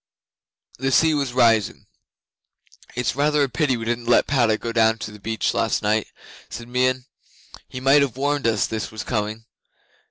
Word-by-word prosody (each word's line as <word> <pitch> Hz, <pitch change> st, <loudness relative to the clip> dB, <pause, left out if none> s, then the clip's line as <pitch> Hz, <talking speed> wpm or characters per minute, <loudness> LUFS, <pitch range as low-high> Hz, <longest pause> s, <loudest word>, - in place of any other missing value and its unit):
The 135 Hz, +1 st, -1 dB
sea 160 Hz, +4 st, +4 dB
was 140 Hz, -4 st, -1 dB
rising. 115 Hz, -4 st, +2 dB, 1.1 s
'"It's 125 Hz, -2 st, -1 dB
rather 150 Hz, +1 st, +2 dB
a 140 Hz, -, -1 dB
pity 130 Hz, -3 st, 0 dB
we 115 Hz, -, -6 dB
didn't 120 Hz, 0 st, -3 dB
let 120 Hz, -, +4 dB
Padda 120 Hz, -6 st, +2 dB
go 115 Hz, -, -5 dB
down 110 Hz, -1 st, +3 dB
to 105 Hz, -, -7 dB
the 105 Hz, -, -13 dB
beach 110 Hz, +2 st, -2 dB
last 115 Hz, -1 st, 0 dB
night," 105 Hz, +1 st, +1 dB, 0.4 s
said 120 Hz, -, -8 dB
Meon. 130 Hz, +1 st, 0 dB, 0.6 s
"He 130 Hz, -, -6 dB
might 135 Hz, +3 st, +4 dB
have 130 Hz, -4 st, -1 dB
warned 145 Hz, -2 st, 0 dB
us 110 Hz, -2 st, +1 dB
this 110 Hz, -1 st, -4 dB
was 110 Hz, -, -7 dB
coming." 110 Hz, -1 st, -3 dB
120 Hz, 170 wpm, -22 LUFS, 110-135 Hz, 1.1 s, sea